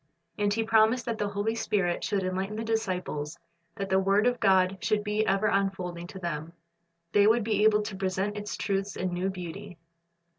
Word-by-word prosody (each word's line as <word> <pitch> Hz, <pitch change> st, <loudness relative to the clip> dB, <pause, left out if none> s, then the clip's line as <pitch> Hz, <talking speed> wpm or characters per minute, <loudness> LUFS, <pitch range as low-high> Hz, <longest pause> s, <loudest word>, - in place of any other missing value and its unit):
And 205 Hz, -1 st, +1 dB
He 225 Hz, +2 st, +1 dB
promised 225 Hz, +2 st, +3 dB
that 230 Hz, -2 st, -3 dB
the 205 Hz, -, 0 dB
Holy 205 Hz, +2 st, -1 dB
Spirit 195 Hz, -6 st, 0 dB
should 200 Hz, -3 st, 0 dB
enlighten 190 Hz, +3 st, -2 dB
the 220 Hz, -, -3 dB
disciples, 180 Hz, -8 st, -2 dB, 0.4 s
that 195 Hz, -, -3 dB
the 190 Hz, 0 st, +4 dB
word 195 Hz, +3 st, +3 dB
of 245 Hz, -1 st, +2 dB
God 190 Hz, 0 st, +3 dB
should 215 Hz, -1 st, +1 dB
be 210 Hz, +1 st, 0 dB
ever 195 Hz, +2 st, +2 dB
unfolding 190 Hz, -4 st, -1 dB
to 190 Hz, -, -10 dB
them. 165 Hz, -2 st, -4 dB, 0.6 s
They 205 Hz, +2 st, +5 dB
would 225 Hz, +1 st, +4 dB
be 210 Hz, -1 st, +1 dB
able 210 Hz, -1 st, +4 dB
to 210 Hz, -2 st, -5 dB
present 190 Hz, +2 st, -1 dB
its 210 Hz, 0 st, -5 dB
truths 195 Hz, -1 st, -2 dB
in 185 Hz, -1 st, -2 dB
new 180 Hz, +2 st, -1 dB
beauty. 185 Hz, +1 st, -7 dB
195 Hz, 190 wpm, -28 LUFS, 185-210 Hz, 0.6 s, They